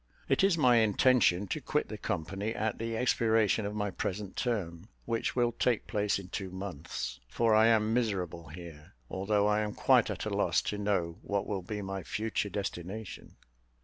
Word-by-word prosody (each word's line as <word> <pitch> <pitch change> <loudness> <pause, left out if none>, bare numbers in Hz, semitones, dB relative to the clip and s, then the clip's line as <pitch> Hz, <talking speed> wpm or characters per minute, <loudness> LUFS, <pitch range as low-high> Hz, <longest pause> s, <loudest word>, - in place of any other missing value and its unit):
It - - +2
is 195 -3 +4
my 125 -5 +5
intention 110 -3 +4
to - - -2
quit - - 0
the - - -6
company 95 +7 -3
at 110 0 -2
the 115 0 -2
expiration 110 -3 +2
of 105 - -5
my 105 -1 -1
present 100 +1 -4
term, 100 -6 -2 0.2
which 115 -1 -1
will 120 -1 +2
take 120 0 0
place 105 -1 0
in 95 -2 -9
two 95 +1 -4
months, 85 -9 -5
for 115 - +2
I 110 +1 +6
am 110 -1 +3
miserable 95 -8 -1
here, 85 +1 -11 0.2
although 100 +2 +1
I 105 0 +3
am 105 -1 -3
quite - - +4
at - - -4
a - - -2
loss - - +2
to 105 - -4
know 95 -5 -1
what 100 -1 -1
will 100 -2 -2
be 105 +3 -5
my 95 0 -4
future 105 +3 -2
destination." 100 +1 -6
105 Hz, 180 wpm, -31 LUFS, 95-110 Hz, 0.2 s, I